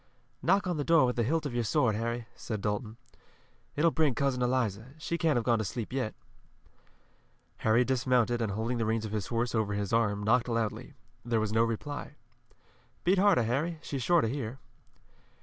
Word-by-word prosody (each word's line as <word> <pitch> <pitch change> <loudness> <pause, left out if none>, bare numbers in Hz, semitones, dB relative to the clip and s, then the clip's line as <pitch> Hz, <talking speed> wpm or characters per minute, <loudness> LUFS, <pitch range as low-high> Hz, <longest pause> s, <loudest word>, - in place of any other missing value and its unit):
"Knock 195 +3 +3
on 175 -3 -1
the 145 - -1
door 165 -2 +5
with 125 - 0
the 120 - +1
hilt 155 +7 0
of 140 - -3
your 120 0 0
sword, 110 +1 +2
Harry," 115 +2 -2
said 110 -3 -5
Dalton. 105 +2 -3 0.8
"It 150 - 0
will 170 - +5
bring 150 -6 +2
Cousin 135 0 0
Eliza. 125 0 -1
She 165 +2 -3
can't 165 -4 +2
have 120 - 0
gone 115 -2 +3
to - - 0
sleep 110 +4 -5
yet." 130 -5 -2 1.4
Harry 115 +3 +3
dismounted 120 -2 +1
and 110 -4 -1
holding 115 +3 -2
the 115 - +1
reins 110 0 0
of 105 - -5
his 105 -3 -2
horse 120 0 -1
over 110 -3 0
his 100 +1 -2
arm, 105 -3 +1
knocked 120 +3 +3
loudly. 115 +3 -2 0.3
There 115 -1 0
was 110 -1 -1
no 115 - +4
reply. 140 +6 -4 0.9
"Beat 185 +2 +3
harder, 195 - +4
Harry. 145 +9 -1
She's 135 -2 -4
sure 170 +6 +4
to - - 0
hear." 125 -1 -4
120 Hz, 195 wpm, -30 LUFS, 110-140 Hz, 1.4 s, door